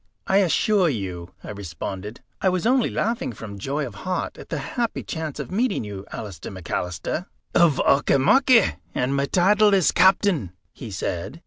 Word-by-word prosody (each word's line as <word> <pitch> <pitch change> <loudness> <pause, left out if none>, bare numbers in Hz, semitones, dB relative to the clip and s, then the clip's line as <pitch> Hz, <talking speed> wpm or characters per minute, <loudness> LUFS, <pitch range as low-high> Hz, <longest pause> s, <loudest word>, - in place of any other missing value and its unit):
"I 190 - +3
assure 190 +1 +3
you," 95 - -5
I - - -7
responded, 100 +2 -6 0.2
"I 190 - +3
was 185 0 -1
only 250 0 +3
laughing 230 - -1
from 100 -2 -9
joy 140 +7 -2
of 120 - -8
heart 185 -1 -2
at - - -11
the 165 - -2
happy 230 - -3
chance 160 -3 -5
of - - -5
meeting 215 - 0
you, 100 -2 -7
Alister 100 -7 -7
McAlister." 90 -1 -4 0.3
"Of 170 -4 +5
Auchimachie, 225 - +4 0.2
and 130 +2 0
my 140 0 +1
title 205 +4 +4
is 185 -4 +3
Captain," 180 - +3 0.2
he 120 - -8
said. 95 - -4
140 Hz, 160 wpm, -23 LUFS, -, 0.3 s, Of